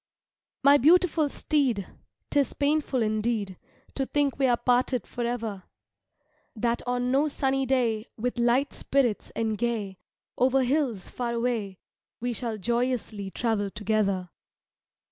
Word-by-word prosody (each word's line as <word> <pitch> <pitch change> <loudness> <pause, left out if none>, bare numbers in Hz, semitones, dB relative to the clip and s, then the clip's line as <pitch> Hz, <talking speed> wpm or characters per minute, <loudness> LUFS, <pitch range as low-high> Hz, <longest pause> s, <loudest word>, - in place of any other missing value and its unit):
My 285 +1 +7
beautiful 325 0 +4
steed, 265 - 0 0.5
'Tis 285 -2 +2
painful 285 -4 +1
indeed 215 -2 -1 0.4
To 270 -1 -2
think 285 -2 0
we 270 - +4
are 240 -1 +3
parted 250 -1 +1
forever; 235 -4 -3 0.9
That 235 +1 0
on 245 0 0
no 280 +3 +3
sunny 270 -2 0
day, 235 -4 +1
With 245 +2 -2
light 245 +4 +2
spirits 255 -6 0
and 220 -2 -1
gay, 220 -5 -2 0.4
Over 260 +1 +4
hills 250 - 0
far 240 -1 -3
away, 230 -5 -1 0.4
We 245 +1 -2
shall 230 -1 -3
joyously 235 -2 -1
travel 215 -1 -1
together. 200 -3 -1
240 Hz, 125 wpm, -27 LUFS, 215-265 Hz, 0.9 s, My